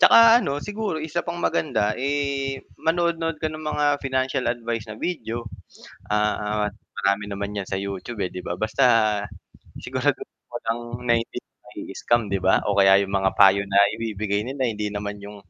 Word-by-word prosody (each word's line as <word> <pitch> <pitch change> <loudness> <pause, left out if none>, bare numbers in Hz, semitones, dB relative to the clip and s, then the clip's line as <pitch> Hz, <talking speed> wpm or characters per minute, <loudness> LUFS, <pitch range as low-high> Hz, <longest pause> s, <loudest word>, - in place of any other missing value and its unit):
Tsaka 230 +5 +8
ano, 140 0 -1
siguro 205 -1 -3
isa 160 +2 -3
pang 170 0 -5
maganda, 115 -11 0
eh, 140 0 -1 0.2
manood-nood 165 -1 0
ka 155 - -1
ng 155 0 -5
mga 150 -1 -1 0.2
financial 130 -1 0
advice 115 -2 -4
na 110 - -8
video, 120 -10 -3 0.6
ah, 105 0 0 0.3
marami 100 +1 +2
naman 100 0 -4
‘yan 95 - -7
sa 95 - -2
YouTube, 100 +3 -4
eh, 90 - -4
‘di 90 - -5
ba. 90 -1 -4
Basta 110 +3 +1 0.9
siguraduhin 130 +2 -2
mo 120 - -6
lang 115 +1 0 0.3
na 120 - +3
hindi 115 - -8
ka - - -60 0.2
mai-i-scam 120 0 -1
‘di 95 - +1
ba, 95 +1 +3
o 105 - +1
kaya 95 0 +6
yung 100 - -7
mga 95 -1 +2
payo 100 0 +6
na 100 - -1 0.2
ibibigay 105 -2 -2
nila, 130 +4 -3
hindi 105 -3 -1
naman 105 0 -5
yung, 100 +1 -9
115 Hz, 175 wpm, -24 LUFS, 100-145 Hz, 0.9 s, Tsaka